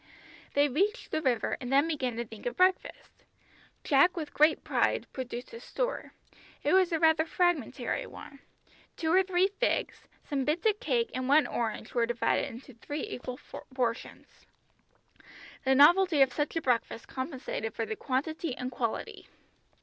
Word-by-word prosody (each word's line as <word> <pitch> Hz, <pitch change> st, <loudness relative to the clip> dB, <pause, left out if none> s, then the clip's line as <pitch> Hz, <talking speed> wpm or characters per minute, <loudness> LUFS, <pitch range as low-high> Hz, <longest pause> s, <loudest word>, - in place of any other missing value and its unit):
They 285 Hz, +1 st, +5 dB
reached 400 Hz, -, -1 dB
the 315 Hz, -, 0 dB
river 250 Hz, -6 st, 0 dB
and 250 Hz, 0 st, -5 dB
then 280 Hz, +3 st, +4 dB
began 265 Hz, -7 st, -2 dB
to 235 Hz, +1 st, -3 dB
think 220 Hz, +1 st, -8 dB
of 245 Hz, -, -4 dB
breakfast. 370 Hz, 0 st, 0 dB, 0.6 s
Jack 300 Hz, +6 st, +4 dB
with 310 Hz, -3 st, -5 dB
great 305 Hz, +2 st, +4 dB
pride -, -, +1 dB
produced 250 Hz, -2 st, -6 dB
his 465 Hz, 0 st, -10 dB
store. -, -, -3 dB, 0.5 s
It -, -, +2 dB
was 375 Hz, -1 st, +4 dB
rather 320 Hz, -1 st, +4 dB
a -, -, -12 dB
fragmentary 350 Hz, -8 st, 0 dB
one. 275 Hz, -, -12 dB, 0.6 s
Two 320 Hz, 0 st, 0 dB
or 375 Hz, -, +6 dB
three 375 Hz, 0 st, +2 dB
figs, -, -, -1 dB, 0.2 s
some 275 Hz, -2 st, -1 dB
bits 305 Hz, +7 st, -1 dB
of 420 Hz, -1 st, +3 dB
cake 240 Hz, -5 st, 0 dB
and 255 Hz, 0 st, -3 dB
one 295 Hz, +2 st, +5 dB
orange 225 Hz, -2 st, -3 dB
were 235 Hz, -1 st, +2 dB
divided 240 Hz, 0 st, 0 dB
into 250 Hz, +3 st, -11 dB
three 290 Hz, +6 st, -5 dB
equal 250 Hz, 0 st, -6 dB, 0.4 s
portions. 240 Hz, -2 st, -4 dB, 1.2 s
The 265 Hz, 0 st, +4 dB
novelty 320 Hz, +1 st, +6 dB
of 260 Hz, -2 st, -1 dB
such 295 Hz, +1 st, -2 dB
a 330 Hz, -, -1 dB
breakfast 235 Hz, -2 st, -1 dB
compensated 260 Hz, -5 st, -5 dB
for 225 Hz, -, -2 dB
the 220 Hz, -, -4 dB
quantity 285 Hz, +3 st, -2 dB
and 250 Hz, 0 st, -4 dB
quality. 235 Hz, -2 st, -4 dB
280 Hz, 160 wpm, -29 LUFS, 250-330 Hz, 1.2 s, or